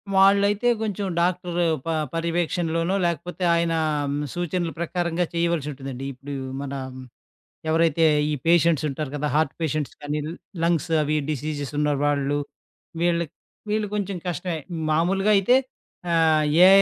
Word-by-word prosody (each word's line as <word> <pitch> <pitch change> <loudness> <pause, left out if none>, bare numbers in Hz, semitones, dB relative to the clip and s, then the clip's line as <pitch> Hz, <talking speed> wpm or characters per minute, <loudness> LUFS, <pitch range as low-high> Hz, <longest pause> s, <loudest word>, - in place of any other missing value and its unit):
వాళ్ళైతే 200 +3 +4
కొంచెం 205 -2 -2
డాక్టరు 175 0 0 0.2
ప - - -8 0.3
పర్యవేక్షణలోనో, 165 +1 0
లేకపోతే 175 +2 -3
ఆయన 170 0 +1 0.6
సూచనల 175 -1 -2
ప్రకారంగా 170 0 -1
చేయవలసుంటుందండి. 145 -6 -2
ఇప్పుడు 135 +3 -8 0.3
మన 140 -1 -5 1.0
ఎవరైతే, 165 0 +3 0.3
ఈ - - +1
పేషెంట్సుంటారు 155 -4 +2
కదా! 150 +1 -2
హార్ట్ 155 -2 +1
పేషెంట్స్ 155 -2 -1
కానీ, 145 +1 -2 0.5
లంగ్స్ 170 0 +1
అవి 150 +1 0
డిసీజెసున్న 150 0 -2 0.2
వాళ్ళు, 145 0 +1 0.6
వీళ్ళకి, 170 -2 +1 0.4
వీళ్ళు 210 0 +1
కొంచెం 200 -2 -2
కష్టమే. 175 0 -2 0.3
మామూలుగా 195 +6 +2
అయితే 245 +7 +4 0.6
ఆహ్, 160 -2 +4 0.2
ఏ - - +9
165 Hz, 110 wpm, -24 LUFS, 150-180 Hz, 1.0 s, ఏ